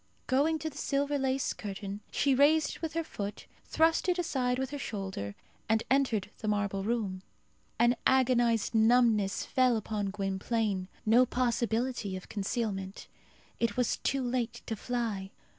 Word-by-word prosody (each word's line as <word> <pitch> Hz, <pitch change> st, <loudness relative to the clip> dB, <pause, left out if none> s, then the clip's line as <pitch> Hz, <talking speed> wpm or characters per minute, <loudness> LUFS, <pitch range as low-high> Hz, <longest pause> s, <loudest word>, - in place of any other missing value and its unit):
Going 295 Hz, +5 st, +2 dB
to 315 Hz, +1 st, -3 dB
the 285 Hz, -, -9 dB
silver 285 Hz, 0 st, 0 dB
lace 265 Hz, 0 st, 0 dB
curtain, 200 Hz, 0 st, -6 dB
she 280 Hz, -2 st, +2 dB
raised 295 Hz, +4 st, +4 dB
it -, -, -23 dB
with 325 Hz, -2 st, -3 dB
her 330 Hz, 0 st, 0 dB
foot, 205 Hz, -8 st, -6 dB, 0.2 s
thrust 325 Hz, +3 st, +2 dB
it 360 Hz, -, +2 dB
aside 260 Hz, -8 st, 0 dB
with 265 Hz, 0 st, -2 dB
her 290 Hz, -, -4 dB
shoulder, 190 Hz, -, -4 dB, 0.3 s
and 220 Hz, 0 st, +3 dB
entered 230 Hz, -7 st, +2 dB
the 215 Hz, -, -4 dB
marble 200 Hz, -2 st, 0 dB
room. 205 Hz, -4 st, -1 dB, 0.6 s
An 240 Hz, +1 st, +4 dB
agonized 240 Hz, -4 st, +3 dB
numbness 225 Hz, -3 st, +3 dB
fell 255 Hz, -3 st, +3 dB
upon 210 Hz, -1 st, -2 dB
Gwynplaine. 195 Hz, 0 st, -1 dB, 0.2 s
No 240 Hz, +4 st, +5 dB
possibility 235 Hz, -3 st, 0 dB
of 185 Hz, -, -11 dB
concealment. 200 Hz, -2 st, -3 dB, 0.5 s
It 230 Hz, -2 st, 0 dB
was 250 Hz, -2 st, +1 dB
too 270 Hz, -1 st, -1 dB
late 240 Hz, -2 st, -2 dB
to 225 Hz, -, -3 dB
fly. 220 Hz, -4 st, -3 dB
235 Hz, 150 wpm, -30 LUFS, 205-260 Hz, 0.6 s, No